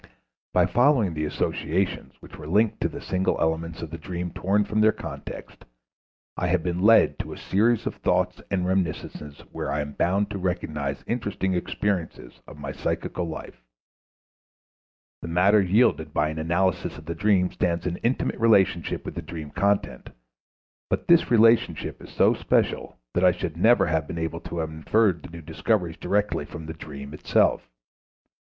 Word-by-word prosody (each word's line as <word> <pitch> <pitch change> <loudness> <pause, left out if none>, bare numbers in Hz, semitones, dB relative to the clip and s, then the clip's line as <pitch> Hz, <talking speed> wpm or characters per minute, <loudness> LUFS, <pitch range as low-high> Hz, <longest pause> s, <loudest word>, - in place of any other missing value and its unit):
By - - +4
following 120 - +3
the 75 0 -2
associations 85 +4 -2
which - - -12
were 75 - -9
linked 105 +6 +2
to - - +1
the - - -8
single 95 0 0
elements 80 0 -1
of 80 - -7
the 85 - -6
dream 90 +1 -5
torn 100 +3 +1
from 105 +1 0
their 110 0 +6
context, - - -9 0.7
I 90 - -1
have 90 -2 +1
been 90 0 -2
led 110 +3 +5
to - - -5
a - - -10
series 110 +4 +1
of - - -3
thoughts - - 0
and 95 -2 0
reminiscences 80 -5 -3
where - - -4
I 75 - -1
am 75 0 -5
bound 100 +7 +1
to 100 - -4
recognize 75 -6 -3
interesting 105 -5 -2
expressions 90 -8 -3
of - - -11
my - - -5
psychical 90 - -3
life. 70 -6 -8 1.6
The - - -6
matter 95 +5 +4
yielded 100 +6 +2
by 75 +1 +2
an 80 +1 -5
analysis 85 +3 0
of 75 - -12
the 85 - -3
dream 95 -2 +2
stands 85 -2 -1
in 90 -1 -2
intimate 120 +3 -1
relationship 100 -7 +2
with - - -5
the - - -5
dream 80 -3 -8
content, 100 0 0 0.8
but - - -1
this 170 -1 +5
relationship 115 0 +3
is - - -11
so - - +3
special - - 0 0.2
that 90 - +1
I 90 - +7
should 85 -2 -4
never 100 +3 +4
have 80 -4 0
been 85 - -6
able 80 0 -3
to 85 - -7
have 80 -1 -2
inferred 85 +3 +1
the - - -10
new 85 -1 -10
discoveries 90 0 -1
directly 105 -5 0
from 80 +1 -9
the 80 - -6
dream 70 -2 -9
itself. 75 - +1
90 Hz, 175 wpm, -25 LUFS, 80-100 Hz, 1.6 s, I